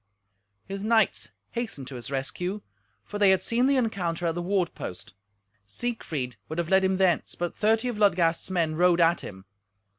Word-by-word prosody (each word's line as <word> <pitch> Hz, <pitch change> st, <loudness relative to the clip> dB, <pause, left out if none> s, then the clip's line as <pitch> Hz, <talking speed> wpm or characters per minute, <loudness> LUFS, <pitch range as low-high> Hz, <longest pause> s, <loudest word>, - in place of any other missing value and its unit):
His 195 Hz, +1 st, -5 dB
knights 225 Hz, 0 st, +2 dB, 0.2 s
hastened 230 Hz, -, -4 dB
to 135 Hz, -, -8 dB
his 120 Hz, -1 st, -7 dB
rescue, 180 Hz, +9 st, -3 dB, 0.4 s
for 205 Hz, -, -6 dB
they 200 Hz, -2 st, +6 dB
had 190 Hz, -1 st, +3 dB
seen 240 Hz, +3 st, +2 dB
the 280 Hz, -, +3 dB
encounter 180 Hz, -9 st, -1 dB
at 165 Hz, -, +1 dB
the 175 Hz, -, -3 dB
ward 180 Hz, -1 st, 0 dB
post. 95 Hz, +3 st, -7 dB, 0.5 s
Siegfried 145 Hz, -, -4 dB
would 160 Hz, -, -5 dB
have 170 Hz, -1 st, -1 dB
led 190 Hz, 0 st, +4 dB
him 190 Hz, 0 st, +2 dB
thence, 185 Hz, -3 st, +1 dB
but 175 Hz, 0 st, -3 dB
thirty 220 Hz, +3 st, +2 dB
of 235 Hz, -4 st, -3 dB
Ludgast's 175 Hz, -5 st, +2 dB
men 170 Hz, -4 st, 0 dB
rode 175 Hz, +1 st, +3 dB
at 170 Hz, 0 st, +4 dB
him. 95 Hz, -1 st, -9 dB
180 Hz, 180 wpm, -27 LUFS, 165-210 Hz, 0.5 s, they